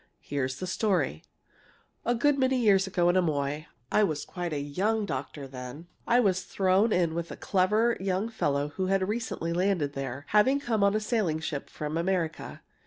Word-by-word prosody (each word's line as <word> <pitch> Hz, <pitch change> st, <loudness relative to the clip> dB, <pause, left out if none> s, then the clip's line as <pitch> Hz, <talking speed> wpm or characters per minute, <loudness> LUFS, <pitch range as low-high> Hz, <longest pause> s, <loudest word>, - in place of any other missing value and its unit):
Here's 130 Hz, -2 st, -2 dB
the 185 Hz, -, -5 dB
story: 180 Hz, -, 0 dB, 0.8 s
"A 240 Hz, -, +2 dB
good 280 Hz, +4 st, +2 dB
many 260 Hz, 0 st, +3 dB
years 200 Hz, -5 st, +4 dB
ago 180 Hz, -2 st, +1 dB
in 175 Hz, -, +3 dB
Amoy 150 Hz, -3 st, 0 dB, 0.2 s
I 210 Hz, -, +4 dB
was 155 Hz, -7 st, -1 dB
quite 175 Hz, -2 st, -4 dB
a 150 Hz, -, -1 dB
young 200 Hz, +10 st, 0 dB
doctor 140 Hz, -2 st, -5 dB
then 130 Hz, +5 st, -9 dB, 0.2 s
I 240 Hz, +1 st, +5 dB
was 190 Hz, -5 st, +2 dB
thrown 195 Hz, +4 st, +2 dB
in 175 Hz, -4 st, +2 dB
with 170 Hz, 0 st, -3 dB
a -, -, -7 dB
clever 210 Hz, +5 st, +2 dB
young 190 Hz, +2 st, -1 dB
fellow 145 Hz, -10 st, -1 dB
who 185 Hz, +5 st, -3 dB
had 190 Hz, 0 st, +1 dB
recently 210 Hz, -6 st, -2 dB
landed 175 Hz, -5 st, +1 dB
there, 135 Hz, 0 st, -5 dB
having 255 Hz, +7 st, +4 dB
come 225 Hz, -7 st, 0 dB
on 200 Hz, +1 st, +4 dB
a -, -, +2 dB
sailing 215 Hz, -7 st, 0 dB
ship 150 Hz, -3 st, -4 dB
from 155 Hz, +2 st, -3 dB
America. 170 Hz, -3 st, -2 dB
185 Hz, 180 wpm, -28 LUFS, 150-210 Hz, 0.8 s, I